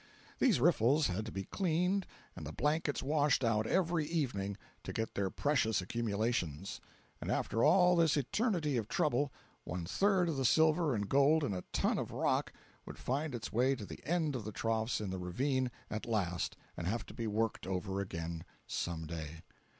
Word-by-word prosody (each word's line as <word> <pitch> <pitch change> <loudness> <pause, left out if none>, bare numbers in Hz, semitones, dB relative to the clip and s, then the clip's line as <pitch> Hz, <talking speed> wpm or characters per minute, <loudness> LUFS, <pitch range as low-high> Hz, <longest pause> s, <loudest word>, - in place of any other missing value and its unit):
These 225 - +4
riffles 145 0 +4
had 105 +4 -2
to - - -5
be 95 - -4
cleaned 180 - 0 0.3
and - - -7
the - - -5
blankets 150 0 0
washed 145 -1 +2
out 110 -2 +2
every 175 -3 +2
evening, 110 - -1 0.3
to - - -5
get 110 0 -3
their 100 -1 0
precious 135 -3 +1
accumulations—and 100 -5 -3
after 115 - 0
all 180 -1 +6
this 165 -3 +4
eternity 155 - 0
of 110 -3 -2
trouble 145 -3 +1 0.3
one 85 0 -4
third 190 - +2
of 160 -4 -1
the 135 - 0
silver 160 +2 +4
and 100 -1 -2
gold 140 +5 +4
in 120 - 0
a 90 - -3
ton - - +1
of - - -3
rock - - 0 0.4
would - - -8
find 140 +1 -2
its 115 - -6
way 130 +4 +3
to 110 - -7
the - - -10
end 160 -4 0
of 120 - -3
the 110 - -5
troughs 110 +2 0
in 100 -3 -3
the 95 - -3
ravine 130 +9 0 0.2
at 110 +2 -4
last 95 -6 -1 0.2
and 85 - -4
have 115 +5 -1
to - - -11
be 115 -2 -3
worked 110 -2 -1
over 95 +1 -2
again 85 -3 -4 0.2
some 85 -1 -3
day. 80 0 -6
120 Hz, 180 wpm, -34 LUFS, 100-155 Hz, 0.4 s, all